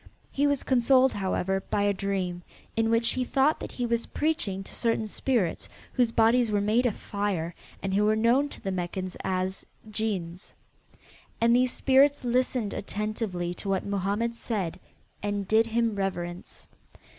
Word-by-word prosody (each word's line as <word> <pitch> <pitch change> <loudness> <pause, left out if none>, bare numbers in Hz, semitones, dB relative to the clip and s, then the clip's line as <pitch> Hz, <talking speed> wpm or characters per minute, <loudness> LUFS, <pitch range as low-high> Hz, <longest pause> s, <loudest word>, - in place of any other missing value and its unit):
He 285 +1 +2
was 285 -1 +1
consoled, 260 +1 +4
however, 190 -1 -1
by 205 - +1
a 205 0 +3
dream 185 -3 -2 0.3
in 225 0 +2
which 230 +1 +3
he 255 - 0
thought 275 +4 +2
that - - -7
he 245 - -2
was 235 -1 0
preaching 210 -12 -1
to - - -11
certain 230 -1 0
spirits 215 -4 -1 0.2
whose 245 -3 +2
bodies 230 +1 +4
were 205 -1 +2
made 220 +5 +2
of 220 - -1
fire 195 -5 -2 0.3
and 195 -1 -1
who 205 +2 +3
were 215 +1 +3
known 240 +6 +3
to - - -10
the 195 - -2
Meccans 185 0 -3
as 185 0 -1 0.3
Djinns. 190 -5 -3 0.8
And 235 +1 +4
these 250 0 +3
spirits 275 +1 +3
listened 245 -3 0
attentively 205 -4 -3
to 195 - -6
what 190 -1 0
Mohammed 200 +4 -1
said 210 -7 -3 0.4
and 205 -1 -2
did 220 +2 +4
him 230 0 +1
reverence. 175 -3 -4
215 Hz, 160 wpm, -27 LUFS, 195-240 Hz, 0.8 s, consoled